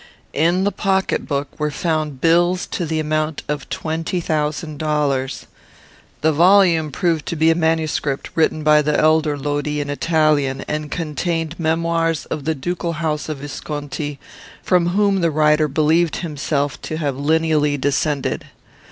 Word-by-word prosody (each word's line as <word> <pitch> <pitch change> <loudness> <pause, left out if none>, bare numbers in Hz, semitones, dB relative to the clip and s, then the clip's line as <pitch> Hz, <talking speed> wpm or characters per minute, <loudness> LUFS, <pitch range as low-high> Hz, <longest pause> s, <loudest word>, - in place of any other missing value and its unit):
In 170 +5 +2
the 205 - +1
pocket 190 -2 0
book 140 -1 -2
were 150 0 0
found 155 -3 -2
bills 175 +2 +3
to 175 - -3
the 160 0 -1
amount 155 0 -1
of 150 0 -4
twenty 165 +3 -2
thousand 155 -1 -2
dollars. 145 -4 -1 0.8
The 160 - +3
volume 170 -2 +4
proved 165 +1 0
to 170 - -2
be 160 +1 +4
a - - +2
manuscript, 160 -4 -1
written 155 -1 +1
by 150 0 +5
the 150 0 +1
elder 155 -1 +3
Lodi 145 +1 -2
in 145 0 -3
Italian, 150 -3 +1
and 150 0 -3
contained 165 +1 -3
memoirs 165 0 0
of 150 -3 -3
the 160 0 0
ducal 170 +4 -3
house 155 -1 -2
of 155 - -3
Visconti, 145 0 -5 0.5
from 180 -2 +2
whom 195 +1 +2
the 170 - +3
writer 150 0 +3
believed 155 +3 +2
himself 145 -3 -2
to 155 - -4
have 145 -4 -1
lineally 150 0 +1
descended. 145 +1 -1
155 Hz, 150 wpm, -20 LUFS, 150-165 Hz, 0.8 s, by